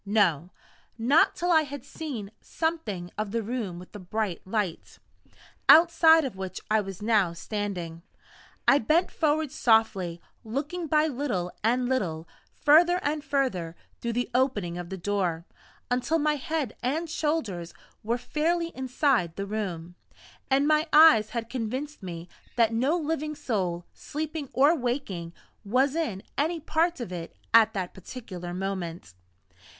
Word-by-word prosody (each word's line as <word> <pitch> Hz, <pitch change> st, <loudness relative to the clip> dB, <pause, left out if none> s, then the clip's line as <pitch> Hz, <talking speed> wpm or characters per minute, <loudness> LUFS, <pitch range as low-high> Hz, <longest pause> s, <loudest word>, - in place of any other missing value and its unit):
No 185 Hz, -6 st, +2 dB, 0.5 s
not 260 Hz, +8 st, +4 dB
till 355 Hz, +1 st, 0 dB
I 320 Hz, -2 st, +6 dB
had 285 Hz, -3 st, -7 dB
seen 250 Hz, -11 st, -6 dB
something 225 Hz, -, -3 dB
of 215 Hz, -1 st, -1 dB
the 230 Hz, +2 st, -2 dB
room 215 Hz, -6 st, -3 dB
with 180 Hz, +1 st, -11 dB
the 210 Hz, -, -9 dB
bright 195 Hz, -1 st, -3 dB
light, 200 Hz, -4 st, -3 dB, 0.7 s
outside 325 Hz, -1 st, +7 dB
of 255 Hz, -, -5 dB
which 190 Hz, -1 st, -5 dB
I 215 Hz, 0 st, +4 dB
was 195 Hz, 0 st, -8 dB
now 210 Hz, -6 st, +3 dB
standing. 175 Hz, -3 st, -4 dB, 0.7 s
I 280 Hz, -, +6 dB
bent 315 Hz, +10 st, +2 dB
forward 310 Hz, -2 st, 0 dB
softly; 220 Hz, -, +2 dB, 0.2 s
looking 290 Hz, +9 st, -3 dB
by 305 Hz, +1 st, +3 dB
little 245 Hz, -, -2 dB
and 245 Hz, +3 st, +2 dB
little 170 Hz, -11 st, -1 dB, 0.3 s
further 340 Hz, +4 st, +5 dB
and 295 Hz, 0 st, -1 dB
further 190 Hz, -, -1 dB, 0.2 s
through 235 Hz, -1 st, -3 dB
the 245 Hz, +1 st, -2 dB
opening 230 Hz, -9 st, +1 dB
of 175 Hz, -1 st, -6 dB
the 190 Hz, -, -5 dB
door, 180 Hz, -3 st, -1 dB, 0.5 s
until 250 Hz, +6 st, +1 dB
my 300 Hz, -1 st, +1 dB
head 290 Hz, -4 st, -3 dB
and 305 Hz, +7 st, -1 dB
shoulders 270 Hz, -, -2 dB, 0.3 s
were 230 Hz, +3 st, -1 dB
fairly 330 Hz, +6 st, -1 dB
inside 255 Hz, -, +1 dB
the 200 Hz, -, -3 dB
room, 185 Hz, -5 st, -4 dB, 0.6 s
and 275 Hz, +2 st, +3 dB
my 310 Hz, +1 st, +3 dB
eyes 305 Hz, -9 st, +7 dB
had 230 Hz, -2 st, -4 dB
convinced 260 Hz, +5 st, -4 dB
me 175 Hz, -2 st, -7 dB, 0.3 s
that 230 Hz, -2 st, +3 dB
no 265 Hz, +9 st, +2 dB
living 305 Hz, -1 st, -2 dB
soul, 185 Hz, -, -2 dB
sleeping 305 Hz, -1 st, -5 dB
or 285 Hz, +6 st, +4 dB
waking, 240 Hz, -, -3 dB, 0.3 s
was 260 Hz, +7 st, +2 dB
in 250 Hz, -, -2 dB, 0.2 s
any 325 Hz, +3 st, 0 dB
part 320 Hz, +2 st, 0 dB
of 235 Hz, -7 st, -5 dB
it 170 Hz, -2 st, -7 dB, 0.2 s
at 220 Hz, -1 st, +6 dB
that 185 Hz, -3 st, -3 dB
particular 185 Hz, -3 st, -8 dB
moment. 175 Hz, -, -4 dB
235 Hz, 145 wpm, -27 LUFS, 190-300 Hz, 0.7 s, outside